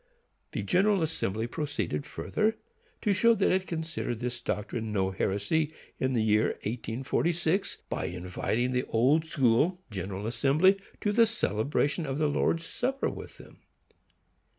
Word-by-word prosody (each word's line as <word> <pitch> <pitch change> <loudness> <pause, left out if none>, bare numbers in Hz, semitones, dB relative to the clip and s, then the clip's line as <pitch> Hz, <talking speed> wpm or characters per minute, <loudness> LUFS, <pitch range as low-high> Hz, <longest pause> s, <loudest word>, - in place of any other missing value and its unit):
The - - -2
General 195 0 +3
Assembly 110 -9 -1
proceeded 120 - -3
further 220 +1 0 0.5
to 205 - +3
show 230 +4 +5
that 195 - +2
it 185 0 +1
considered 160 -7 -3
this 120 +1 -4
doctrine 110 0 -3
no 95 -2 +1
heresy, 145 - 0 0.3
in 130 0 +1
the 115 -3 +2
year 105 0 +3
1846, 155 - -1
by - - -2
inviting 90 +7 -1
the 125 0 0
Old 140 +8 +3
School 145 +6 +2
General 95 +1 -4
Assembly 150 - +3 0.2
to 205 - +1
the 230 +2 +5
celebration 145 - 0
of 135 0 -2
the 155 - +2
Lord's 165 +3 +1
supper 270 +9 -1
with - - -9
them. - - -15
140 Hz, 140 wpm, -29 LUFS, 110-175 Hz, 0.5 s, show